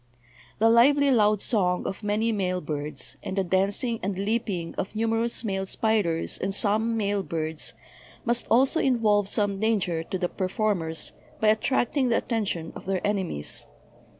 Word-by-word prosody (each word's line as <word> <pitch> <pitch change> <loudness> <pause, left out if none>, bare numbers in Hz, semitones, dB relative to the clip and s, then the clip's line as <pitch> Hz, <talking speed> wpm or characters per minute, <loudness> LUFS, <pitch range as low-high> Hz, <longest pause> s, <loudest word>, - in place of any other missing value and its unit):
The 225 - +4
lively 280 +4 +5
loud 210 -4 +3
song 180 -6 +1
of 195 - -4
many 210 +2 0
male 185 -4 -1
birds, 145 -5 -4
and 190 - -5
the 195 - +2
dancing 200 +6 0
and 195 0 -2
leaping 200 -4 -2
of 195 - -4
numerous 225 +2 +1
male 195 -3 -2
spiders 200 -7 0
and 195 +1 -1
some 220 +3 +1
male 205 -2 0
birds 160 -2 -4 0.5
must 235 0 +1
also 265 +7 +4
involve 215 -6 +2
some 205 -2 0
danger 195 -7 +1
to 190 +4 -4
the 180 -1 0
perform 195 +1 -1
ers 160 0 -5 0.3
by 215 - +3
attracting 250 +4 +1
the 230 - +3
attention 200 -8 -2
of - - -9
their 190 -1 -1
enemies. 190 - -2
205 Hz, 155 wpm, -26 LUFS, 180-225 Hz, 0.5 s, lively